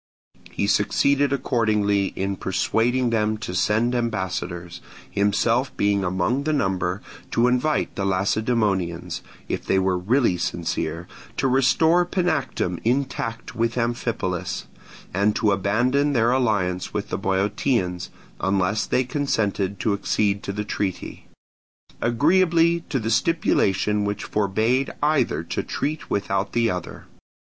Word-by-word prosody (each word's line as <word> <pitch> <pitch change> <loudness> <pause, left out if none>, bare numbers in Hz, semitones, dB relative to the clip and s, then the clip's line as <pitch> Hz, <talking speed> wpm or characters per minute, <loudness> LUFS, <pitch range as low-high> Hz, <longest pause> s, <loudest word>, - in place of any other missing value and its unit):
He - - -2
succeeded 140 0 +2
accordingly 110 -7 +1
in 95 +1 -2
persuading 120 +6 0
them 110 -1 +1
to 105 -4 -6
send 110 +6 +1
ambassadors, 90 -6 -3 0.3
himself 115 +6 +1
being 100 -1 +2
among 95 +8 0
the 155 - +1
number, 95 -6 -1 0.3
to 120 +1 +2
invite 125 +5 +1
the 100 - -2
Lacedaemonians, 95 -2 0 0.3
if - - -3
they - - +1
were 95 -1 +1
really 110 0 +2
sincere, 85 -1 -3 0.3
to - - +1
restore 150 +7 +4
Panactum 160 - -1
intact 120 -2 -2
with 115 +1 0
Amphipolis, 95 -7 -2 0.5
and 100 +3 +2
to 105 - +2
abandon 120 +9 +1
their 115 -2 +3
alliance 105 -8 0
with - - -2
the - - -2
Boeotians 95 -1 0 0.3
(unless 95 +2 0
they 130 - +2
consented 105 -8 -1
to 110 - +1
accede 100 0 0
to - - -4
the 105 +1 -4
treaty), 100 -3 -4 0.7
agreeably 170 +6 +3
to 145 - 0
the 115 -2 -2
stipulation 105 - +2
which 105 0 -2
forbade 110 +6 +1
either 150 -1 +2
to - - -3
treat 155 +2 -3
without 100 -1 -1
the 115 -1 +2
other. 90 -2 -6
110 Hz, 125 wpm, -23 LUFS, 95-125 Hz, 0.7 s, restore